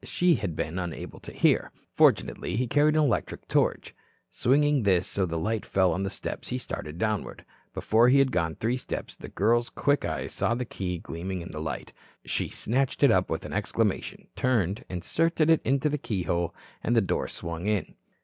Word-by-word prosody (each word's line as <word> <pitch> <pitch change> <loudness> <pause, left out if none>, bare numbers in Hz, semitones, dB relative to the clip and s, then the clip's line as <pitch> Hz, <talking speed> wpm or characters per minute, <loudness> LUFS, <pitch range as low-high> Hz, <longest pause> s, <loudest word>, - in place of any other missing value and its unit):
She 175 -1 +2
had 85 -6 -3
been 80 +5 -2
unable 85 -3 -6
to - - -9
hear. - - +2 0.2
Fortunately, 90 - +2
he 125 +3 +1
carried 150 +5 +3
an 155 - +4
electric 140 - -1
torch. - - +1 0.4
Swinging 145 +2 +3
this 95 -4 +3
so 95 -2 -1
that - - -8
the 85 - -2
light 110 +5 -1
fell 95 -2 +2
on 90 - -2
the 95 - -1
steps, - - -6
he - - -2
started 75 +2 -6
downward. 110 +1 -2 0.3
Before 115 +3 +4
he 135 - +5
had 135 -1 +4
gone 85 -5 0
three 120 +3 0
steps, - - -6
the - - -10
girl's 120 +4 +2
quick 145 0 +1
eyes 80 -2 -3
saw 115 - +1
the 125 +1 -2
key 90 -5 -4
gleam 85 +2 -6
in 90 -2 -4
the 75 - -5
light. 75 -5 -5 0.3
She - - -1
snatched 130 +4 -1
it - - +7
up - - +2
with - - -3
an - - -6
exclamation, - - -1
turned, 110 -7 0
inserted 160 - +1
it 160 - +4
in 135 - +2
the 150 +2 0
keyhole, 85 - -1 0.3
and 120 - +1
the 115 - +5
door 95 - -1
swung 85 +2 -5
in. 105 -3 0
105 Hz, 195 wpm, -27 LUFS, 90-130 Hz, 0.4 s, it